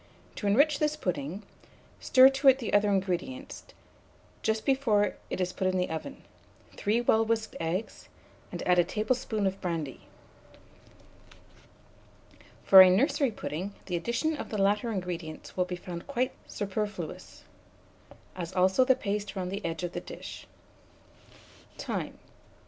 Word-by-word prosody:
To 205 - -2
enrich 285 +8 +4
this 300 0 +1
pudding, 180 - -3 0.6
stir 260 0 +7
to 270 0 +5
the 255 -4 -6
other 205 0 +4
ingredients, 200 +9 -2 0.8
just 220 0 -1
before 240 -7 +2 0.2
it - - -3
is 180 -1 -1
put 190 - -1
in 185 0 +1
the 180 -2 -1
oven, 160 - -6 0.5
3 220 +4 +1
well 225 -2 +3
whisked 225 0 -1
eggs, 170 +6 -4 0.4
and - - -5
add 180 -1 +4
a - - +6
tablespoonful 215 +2 -1
of 190 0 -2
brandy. 165 -7 -4 2.6
For 190 -1 +10
a 185 - +9
nursery 270 +7 +2
pudding, 195 -2 -5
the 180 - -3
addition 235 - -1
of - - -6
the 215 - -3
latter 205 +4 +1
ingredients 175 -5 -5
will 180 - +1
be 180 0 -4
found 175 -1 -8
quite 255 -2 0 0.2
superfluous, 205 -4 -5 0.9
as 180 0 -6
also 190 +6 +4
the 260 0 +4
paste 205 -4 -3
round 185 -1 -3
the 200 +1 -4
edge 165 +1 -3
of 175 - -2
the - - -5
dish. - - -9 1.3
Time. - - -4
200 Hz, 140 wpm, -29 LUFS, 180-235 Hz, 2.6 s, For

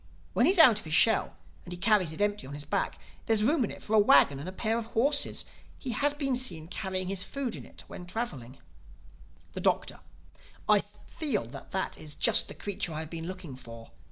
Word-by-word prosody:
When - - +3
he - - +6
is 390 - -1
out 250 -10 +8
of - - -12
his 155 0 0
shell 220 +7 +4 0.3
and 180 - -11
he 175 - -4
carries 190 -4 +3
it 160 - -6
empty 205 -6 -1
on 140 - -7
his 145 0 -8
back, 150 - -1 0.3
there 225 - +3
is 210 - +1
room 285 +3 +2
in - - -6
it - - -10
for 215 - -4
a 215 - +6
wagon 140 -8 +5
and 155 +6 -6
a - - -6
pair 220 +4 -1
of 225 - -7
horses. 285 +4 +1 0.3
He 260 - -5
has 290 +6 +1
been 275 -3 -1
seen 170 -11 -2
carrying 185 0 -3
his 190 -1 -1
food 270 -2 -4
in - - -9
it - - -14
when 175 - -10
traveling." 140 - -5 1.0
The - - -5
Doctor: - - 0 0.7
"I 210 -1 +6 0.3
feel 290 - -2
that - - -10
that 190 - -2
is 150 -1 -7
just - - +5
the - - -9
creature 190 -4 -3
I 155 - -3
have 160 - -8
been 165 0 -6
looking 185 -7 -7
for. 115 -2 -12
195 Hz, 230 wpm, -29 LUFS, 160-230 Hz, 1.0 s, out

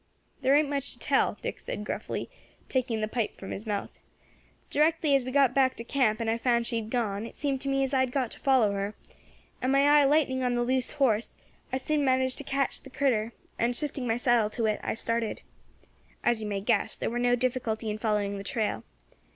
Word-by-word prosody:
"There 265 +1 +4
ain't 300 0 +4
much 280 -1 -2
to - - -9
tell," - - +1
Dick - - -4
said 210 - -5
gruffly, - - -4 0.4
taking 245 -4 0
the 215 - 0
pipe 225 0 -2
from 195 - -8
his 215 +3 -6
mouth. 205 -2 -3 0.7
"Directly 310 0 +3
as 275 -2 +4
we 255 - -5
got 275 -2 +4
back 260 -1 +3
to 230 - -6
camp, 235 -4 +1
and 230 - -2
I 225 +1 +1
found 235 -1 +2
she 235 -1 -1
had 220 -1 -4
gone, 225 -3 -1
it - - -13
seemed 275 -2 -2
to 275 - -3
me 275 0 +2
as 270 - -2
I 265 - +3
had 260 -1 +1
got 255 -3 -1
to - - -9
follow 255 -6 +3
her; 200 +1 -3 0.7
and 255 - +1
my 275 0 +4
eye 290 0 +6
lighting 275 -2 +2
on 250 -1 +1
the 240 - +1
loose 255 0 0
horse, 235 -6 +1 0.4
I 260 - 0
soon 295 +2 0
managed 260 0 +1
to - - -5
catch 275 -1 -1
the 270 - -12
critter, 235 -5 0 0.3
and, 240 +1 +1
shifting 280 -4 -2
my 225 0 +1
saddle 240 -3 +3
to 230 +1 -2
it, 215 -1 +1
I - - -2
started. 230 0 -2 0.8
As 240 -2 +2
you 215 - -3
may 200 -1 -2
guess, 200 - +1
there - - -2
war 240 - -2
no 245 0 +3
difficulty 240 -3 -1
in 210 - -4
following 210 -2 0
the - - -6
trail. 210 - -2
245 Hz, 225 wpm, -28 LUFS, 220-270 Hz, 0.8 s, eye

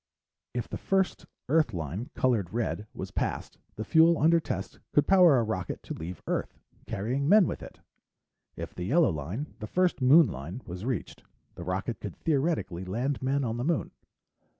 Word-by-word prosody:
If 120 - -2
the - - -6
first 190 -1 0 0.2
Earth 150 - +2
line, 85 - -4
colored 115 -9 +1
red, 110 -2 -2
was - - -7
passed, - - -3 0.2
the 110 - -4
fuel 165 +3 +5
under 165 +3 +4
test - - -5
could 145 - +4
power 180 -7 +6
a 120 - +3
rocket 100 -6 -3
to - - -6
leave 85 +3 -7
Earth, - - -2 0.3
carrying 130 +8 -1
men 205 -1 +7
with - - -4
it. - - -11 0.7
If - - -6
the 90 - -5
yellow 155 - +4
line 85 - -5
the 105 - -5
first 180 +1 +1
Moon 150 +6 +7
line 90 - -6
was 90 +4 -7
reached, 125 -6 -4 0.3
the 85 - -8
rocket 95 +6 -3
could 100 -4 -6
theoretically 145 - 0
land 120 +9 -2
men 135 +2 +1
on 115 -2 -2
the 120 - -2
Moon. 160 +1 0
125 Hz, 175 wpm, -28 LUFS, 95-155 Hz, 0.7 s, men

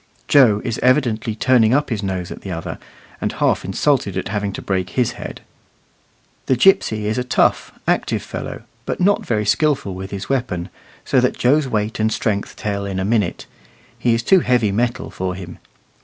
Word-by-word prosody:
Joe 120 -8 +5
is 115 -2 -2
evidently 120 -5 +2
turning 120 0 +4
up 145 -2 0
his 110 -3 -1
nose 95 -3 -3
at - - -8
the 95 - -7
other, 85 -2 -5 0.4
and - - -1
half - - +1
insulted 100 +1 0
at 95 - -3
having 105 -1 -2
to - - -6
break 95 -2 -1
his 125 +3 0
head. - - -8 1.1
The 130 - +3
gipsy 115 - +3
is 110 +4 0
a - - 0
tough, 125 - +1 0.2
active - - 0
fellow, - - -6 0.2
but - - -2
not 200 +3 +3
very 105 -2 -1
skilful 140 - +1
with 95 +1 -6
his 100 0 -6
weapon, 120 -10 -2 0.4
so - - +3
that - - +1
Joe's 140 +3 +3
weight 110 -2 -2
and 110 0 +2
strength 105 -2 -2
tell 100 -1 -3
in 95 -1 -3
a 95 - -1
minute; 105 -4 0 0.5
he 120 -2 +2
is 115 - -2
too 190 +9 +5
heavy 125 - +2
metal 120 +4 -1
for 90 0 -3
him. 90 -2 -9
110 Hz, 185 wpm, -20 LUFS, 100-125 Hz, 1.1 s, Joe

